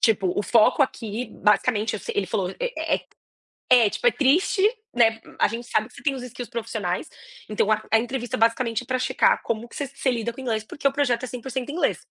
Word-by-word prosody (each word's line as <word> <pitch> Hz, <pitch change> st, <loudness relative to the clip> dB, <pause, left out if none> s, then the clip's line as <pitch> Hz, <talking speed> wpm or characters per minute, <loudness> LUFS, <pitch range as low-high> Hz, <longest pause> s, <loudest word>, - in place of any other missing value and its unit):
Tipo, 195 Hz, -5 st, +2 dB
o 205 Hz, -, +1 dB
foco 230 Hz, +6 st, +4 dB
aqui 230 Hz, -2 st, -3 dB, 0.2 s
basicamente 210 Hz, 0 st, +2 dB
eu 215 Hz, -, -3 dB
sei -, -, -6 dB
ele 195 Hz, -2 st, +1 dB
falou, 190 Hz, -2 st, -1 dB
é -, -, -1 dB, 0.7 s
é, 235 Hz, -4 st, +6 dB
tipo 485 Hz, -, -6 dB
é -, -, +7 dB
triste, 330 Hz, +8 st, +2 dB, 0.3 s
né, 225 Hz, -2 st, +3 dB, 0.2 s
a -, -, +5 dB
gente 235 Hz, +1 st, -5 dB
sabe 215 Hz, -, 0 dB
que -, -, -20 dB
você -, -, -13 dB
tem 280 Hz, -3 st, +2 dB
os 260 Hz, -, -6 dB
skills 245 Hz, -1 st, -7 dB
profissionais, 220 Hz, -6 st, -3 dB, 0.4 s
então 215 Hz, 0 st, +1 dB
a 215 Hz, 0 st, +2 dB
a 225 Hz, -, +6 dB
entrevista 245 Hz, +1 st, -3 dB
basicamente 230 Hz, +1 st, +1 dB
é -, -, -16 dB
para 255 Hz, 0 st, -1 dB
checar 260 Hz, 0 st, +2 dB
como 230 Hz, +1 st, -3 dB
que -, -, -15 dB
você 285 Hz, -3 st, -3 dB
você 275 Hz, -1 st, -1 dB
lida 235 Hz, -1 st, -2 dB
com 230 Hz, -, -20 dB
o -, -, -5 dB
inglês 220 Hz, -3 st, -1 dB
porque 280 Hz, +5 st, -2 dB
o -, -, +2 dB
projeto 255 Hz, -4 st, +1 dB
é -, -, -3 dB
100% 255 Hz, +2 st, -5 dB
inglês. 345 Hz, -, -1 dB
235 Hz, 225 wpm, -24 LUFS, 220-260 Hz, 0.7 s, é